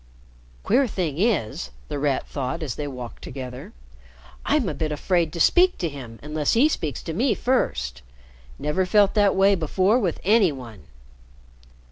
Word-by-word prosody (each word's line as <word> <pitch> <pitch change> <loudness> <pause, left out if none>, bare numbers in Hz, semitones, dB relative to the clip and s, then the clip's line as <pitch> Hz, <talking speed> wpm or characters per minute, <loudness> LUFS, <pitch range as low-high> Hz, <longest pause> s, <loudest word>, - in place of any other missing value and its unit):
"Queer 260 +4 +3
thing 170 -8 -3
is," 155 - 0 0.2
The 145 - -4
Rat 140 -2 0
thought 135 +4 -4
as 140 -7 -3
they 150 - -5
walked 125 -4 -8
together, 125 -2 -7 0.7
"I'm 290 -6 +1
a - - -2
bit 155 -1 -3
afraid 165 +2 0
to 170 - -5
speak 360 - +4
to 170 - -2
him 125 -6 -9
unless 150 0 -1
he 245 +6 +5
speaks 150 - -3
to 165 - -4
me 235 - +1
first. 65 - -1 0.6
Never 180 - -1
felt 205 0 +4
that 205 -2 +3
way 195 +1 +5
before 190 - +2
with 185 -8 -1
any 205 -3 +4
one." 115 - -10
165 Hz, 160 wpm, -24 LUFS, 135-205 Hz, 0.7 s, he